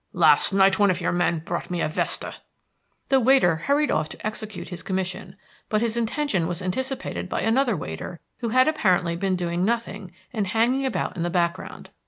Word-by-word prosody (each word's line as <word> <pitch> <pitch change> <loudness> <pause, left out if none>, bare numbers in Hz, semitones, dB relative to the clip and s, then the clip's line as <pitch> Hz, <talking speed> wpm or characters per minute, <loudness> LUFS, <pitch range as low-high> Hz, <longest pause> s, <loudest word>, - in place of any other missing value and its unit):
Last - - +5
night 195 0 +4
one 205 -1 +5
of 185 -1 +1
your 175 - 0
men 175 -2 0
brought - - -4
me 175 -1 -2
a - - +1
vesta." 155 - -2 0.7
The 270 -1 +5
waiter 245 -10 +4
hurried 285 - +1
off 155 - 0
to - - -10
execute 215 -1 -5
his 180 -2 -6
commission, 185 -1 -4 0.3
but 215 0 +1
his 230 -1 0
intention 235 - 0
was 175 0 -2
anticipated 260 +2 -3
by - - -2
another 230 -1 +2
waiter 115 - -6 0.2
who 235 -2 -2
had 255 +4 +4
apparently 185 - +2
been 190 +2 0
doing 175 0 -1
nothing 210 -4 -2 0.2
and 210 -4 -1
hanging 240 +6 +1
about - - -2
in - - -3
the 175 - 0
background. 170 -1 -2
195 Hz, 190 wpm, -24 LUFS, 175-235 Hz, 0.7 s, Last